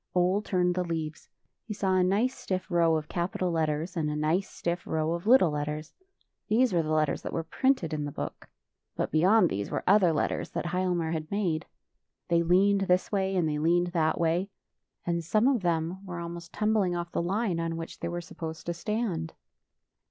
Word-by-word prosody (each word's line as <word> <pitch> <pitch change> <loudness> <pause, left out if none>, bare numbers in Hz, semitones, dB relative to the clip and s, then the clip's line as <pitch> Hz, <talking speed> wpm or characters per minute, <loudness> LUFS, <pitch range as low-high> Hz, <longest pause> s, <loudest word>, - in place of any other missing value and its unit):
Ole 180 +3 +3
turned 180 -3 +1
the 180 0 0
leaves. 160 -2 -4 0.4
He 210 - -4
saw 195 -2 0
a 185 - +4
nice 210 +8 +1
stiff 185 0 -4
row 170 -2 +4
of 155 -1 -2
capital 180 +1 -1
letters, 160 +1 -1
and 155 -3 0
a 150 - -2
nice 160 +6 0
stiff 170 +1 -3
row 160 0 0
of 170 +4 -5
little 230 -9 +6
letters. 150 +1 -4 0.5
These 230 +1 +3
were 170 - +3
the 155 - -4
letters 155 -2 +1
that - - -5
were 165 - -2
printed 180 - +1
in 150 -1 -2
the 145 - -4
book. - - -6 0.5
But - - -2
beyond 185 +5 +5
these 100 +1 -2
were - - -2
other 190 -3 +5
letters 150 - -1
that - - -2
Hialmar 175 -2 0
had 155 -1 -3
made. 175 -6 -1 0.6
They 170 -1 +4
leaned 195 +4 +4
this 180 +1 +2
way, 195 -2 0
and 175 -3 +2
they 150 -1 -1
leaned 175 +3 +2
that 160 -3 +1
way; 170 +4 +1 0.6
and 170 -1 -1
some 215 +8 +2
of 265 -5 +2
them 170 +2 -1
were 180 -3 -6
almost 170 0 -7
tum 215 +1 +1
bling 190 -5 +2
off 175 0 -4
the - - -1
line 190 0 0
on 165 0 -2
which 165 0 -7
they 170 - -3
were 175 0 -3
sup 170 - -14
posed 160 -1 -5
to 170 - -1
stand. 175 -3 -3
175 Hz, 205 wpm, -28 LUFS, 160-190 Hz, 0.6 s, little